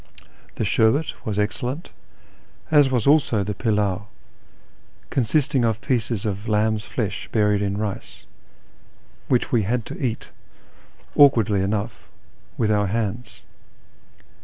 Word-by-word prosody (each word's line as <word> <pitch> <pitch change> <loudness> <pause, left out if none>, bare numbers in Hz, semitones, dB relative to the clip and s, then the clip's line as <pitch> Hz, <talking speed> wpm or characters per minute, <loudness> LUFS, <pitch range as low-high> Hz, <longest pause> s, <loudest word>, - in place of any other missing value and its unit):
The - - -1
sherbet 115 +8 +2
was 105 -2 -2
excellent, 125 +8 -2 0.8
as 145 -3 +6
was 125 -4 0
also 140 -8 +3
the 105 - -3
pilmv 100 -3 0 1.1
(consisting 130 +1 +1
of 110 -2 +1
pieces 115 -3 -1
of 100 0 -3
lamb's 110 0 +1
flesh 105 -5 -4
buried 105 -2 +2
in 100 -1 -1
rice), 105 -2 -5 1.0
which 125 - +1
we 120 - +3
had 115 +3 -1
to - - -7
eat, 120 -3 -3 0.9
awkwardly 115 -8 +5
enough, 105 +3 -3 0.5
with 110 -2 +1
our 105 -1 +2
hands. 110 +2 -3
110 Hz, 115 wpm, -23 LUFS, 105-125 Hz, 1.1 s, as